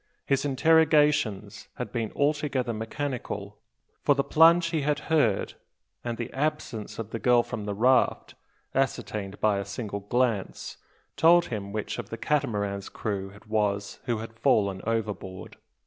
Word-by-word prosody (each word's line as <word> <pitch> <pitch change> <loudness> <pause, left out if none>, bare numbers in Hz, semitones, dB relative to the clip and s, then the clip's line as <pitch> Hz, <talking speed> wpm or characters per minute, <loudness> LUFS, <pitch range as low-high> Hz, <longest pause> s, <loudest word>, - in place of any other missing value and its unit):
His 135 +1 +1
interrogations 145 -9 +3
had 125 - -5
been 115 -3 -2
altogether 140 -4 0
mechanical, 110 -3 -5 0.4
for 145 - +3
the 140 - +1
plunge 165 +3 +5
he 160 -3 0
had 145 +1 +1 0.2
heard, 115 -11 +2 0.5
and 120 -1 -3
the 120 - -5
absence 145 -7 -3
of 115 -1 -6
the 115 - -3
girl 120 0 +4
from 115 -4 -6
the 100 -1 -3
raft, 125 +5 +2 0.4
ascertained 105 -6 -2
by 105 -2 +2
a - - -2
single 100 0 -5
glance, 110 -1 -1 0.4
told 170 +1 +6
him 100 -2 -4
which 105 0 -4
of - - -6
the - - -5
Catamaran's 100 -9 -1
crew 100 -3 -3
it 105 - -17
was 105 -2 -1
who 120 -3 0
had 115 +1 -7
fallen 100 -8 +2
overboard. 105 -5 -3
115 Hz, 150 wpm, -27 LUFS, 105-140 Hz, 0.5 s, told